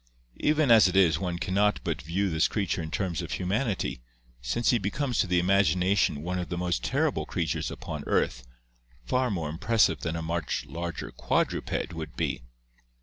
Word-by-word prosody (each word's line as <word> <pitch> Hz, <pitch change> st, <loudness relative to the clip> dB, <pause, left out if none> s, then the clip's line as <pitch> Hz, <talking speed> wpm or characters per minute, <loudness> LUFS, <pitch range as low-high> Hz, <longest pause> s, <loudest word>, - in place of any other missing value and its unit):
Even 150 Hz, -3 st, +3 dB
as 110 Hz, -4 st, +8 dB
it 90 Hz, -, -2 dB
is 90 Hz, -4 st, +4 dB
one 90 Hz, -2 st, -2 dB
can 95 Hz, -, -3 dB
not 105 Hz, +1 st, +3 dB
but -, -, -2 dB
view 95 Hz, +5 st, -1 dB
this 80 Hz, +1 st, +3 dB
creature 95 Hz, -5 st, -1 dB
in 80 Hz, -, -5 dB
terms 90 Hz, -1 st, -2 dB
of -, -, -5 dB
humanity, 100 Hz, -, -1 dB, 0.5 s
hence 120 Hz, -, +2 dB
he 120 Hz, -, +2 dB
becomes 125 Hz, +6 st, -1 dB
to -, -, +3 dB
the 90 Hz, 0 st, +2 dB
imagina 95 Hz, 0 st, +3 dB
tion 75 Hz, -6 st, +1 dB
one 90 Hz, +1 st, -2 dB
of 90 Hz, -, -4 dB
the 85 Hz, -, -3 dB
most 90 Hz, 0 st, -1 dB
terrible -, -, 0 dB
creatures -, -, -2 dB
upon -, -, -6 dB
earth, -, -, +1 dB, 0.6 s
far 125 Hz, -, +1 dB
more 85 Hz, -7 st, -2 dB
im 80 Hz, -, -7 dB
pressive 115 Hz, -2 st, +3 dB
than 85 Hz, -1 st, -3 dB
a 80 Hz, -, -3 dB
much 80 Hz, -1 st, -2 dB
larger 85 Hz, -1 st, -5 dB
quadruped 85 Hz, -, -1 dB
would 80 Hz, -2 st, -7 dB
be. -, -, -2 dB
90 Hz, 190 wpm, -28 LUFS, 85-105 Hz, 0.6 s, as